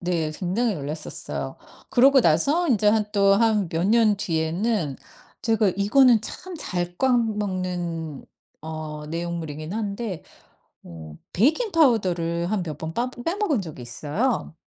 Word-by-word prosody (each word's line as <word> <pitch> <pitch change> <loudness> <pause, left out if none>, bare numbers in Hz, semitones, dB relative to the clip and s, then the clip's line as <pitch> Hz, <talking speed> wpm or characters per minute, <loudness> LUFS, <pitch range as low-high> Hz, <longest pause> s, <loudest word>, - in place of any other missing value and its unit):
네 170 -3 -1
굉장히 200 +7 -1
놀랐었어요. 150 +1 -4 0.3
그러고 265 +2 +6
나서 275 - +3
이제 215 -4 +3
한 215 0 +3
또 200 -1 +4
한 215 -5 +2
몇 165 +3 0
년 220 -2 +4
뒤에는 165 - -1 0.5
제가 225 -3 +2
이거는 230 +3 +5
참 370 +10 -8
잘 175 - -3
까먹는 185 - -1 0.4
어 155 -1 -6
내용물이긴 165 -1 -5
한데 210 -3 -4 0.6
어 80 -2 -10 0.2
베이킹파우더를 220 - +2
한 205 -3 0
몇 155 -3 -6
번 160 +1 -6
빠 245 +4 -1
빼먹은 315 - -1
적이 155 -7 -9
있어요. 160 - -2
190 Hz, 255 characters per minute, -24 LUFS, 160-230 Hz, 0.6 s, 그러고